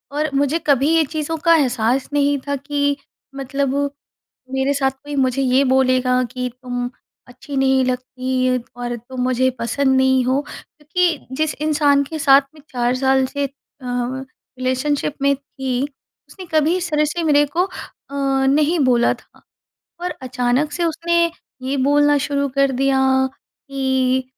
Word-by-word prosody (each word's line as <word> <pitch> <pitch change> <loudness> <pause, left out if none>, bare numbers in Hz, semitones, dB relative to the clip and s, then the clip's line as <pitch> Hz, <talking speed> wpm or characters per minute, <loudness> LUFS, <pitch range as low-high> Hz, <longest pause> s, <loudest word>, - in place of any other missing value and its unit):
और 305 +1 0
मुझे 285 +3 +2
कभी 280 0 +3
ये 325 - +4
चीज़ों 315 +2 -3
का 335 +1 +4
एहसास 255 -3 +1
नहीं 285 0 +2
था 285 - 0
कि 285 +1 -1 0.4
मतलब 275 0 -2 0.8
मेरे 265 +1 +1
साथ 270 -1 +1
कोई 290 +2 -10
मुझे 265 0 +1
ये 260 +1 +3
बोलेगा 255 -1 +2
कि, 250 +1 -4
"तुम 245 -1 -3 0.4
अच्छी 255 +3 -9
नहीं 265 -1 +3
लगती 255 0 -1 0.2
और 240 0 -3
तुम 250 +3 -8
मुझे 255 +1 +2
पसंद 265 +3 +1
नहीं 260 -1 +3
हो।" 260 +3 +1
क्योंकि 310 -3 -3
जिस 310 +1 0
इंसान 295 -2 +2
के 315 +3 -6
साथ 275 -2 +6
मैं 305 - -15
4 245 -1 0
साल 265 0 +2
से 285 +2 -3
अ, - - -11 0.4
रिलेशनशिप 260 +3 -3
में 280 0 +4
थी। 265 -2 -4 0.5
उसने 380 - -10
कभी 315 +3 +3
इस 355 -2 -3
तरह 300 0 +2
से 320 +3 -2
मेरे 290 -1 +4
को 360 - +4
अ, 385 - -8 0.8
नहीं 300 +5 +3
बोला 240 -1 +3
था। - - -22 0.6
और 360 0 -2
अचानक 255 +3 0
से 345 +3 -2
उसने 340 +1 +1 0.3
ये 265 +2 -2
बोलना 290 +2 +3
शुरू 280 0 -1
कर 275 -1 +3
दिया 270 +1 +1 0.3
कि, 265 -2 -2
270 Hz, 155 wpm, -20 LUFS, 255-290 Hz, 0.8 s, साथ